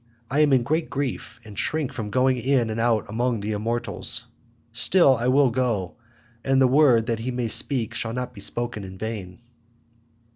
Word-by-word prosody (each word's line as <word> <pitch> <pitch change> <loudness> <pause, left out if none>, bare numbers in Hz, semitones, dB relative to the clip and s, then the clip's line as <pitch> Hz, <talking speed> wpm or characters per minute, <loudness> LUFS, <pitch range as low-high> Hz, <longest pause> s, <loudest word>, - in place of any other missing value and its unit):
I 140 - +1
am 150 -1 +4
in 130 -3 +4
great 155 +6 -1
grief, 135 -4 -4
and 105 -1 -11
shrink 155 0 -1
from 110 -3 -5
going 130 +3 +2
in 125 -2 +1
and 110 - -3
out 115 -2 +1
among 120 +2 -1
the 105 +2 -3
immortals. 115 +1 -2 0.5
Still, 130 +5 +5
I 120 +1 -2
will 135 0 +4
go, 115 -7 -1 0.5
and 135 0 +2
the 135 - +5
word 130 -4 +4
that 115 -2 -2
he 120 +3 -4
may 125 -2 -2
speak 120 +1 0
shall 115 -1 -3
not 125 +1 -4
be 100 - -11
spoken 120 0 -3
in 95 0 -9
vain." 100 -4 -6
120 Hz, 185 wpm, -24 LUFS, 110-130 Hz, 0.5 s, Still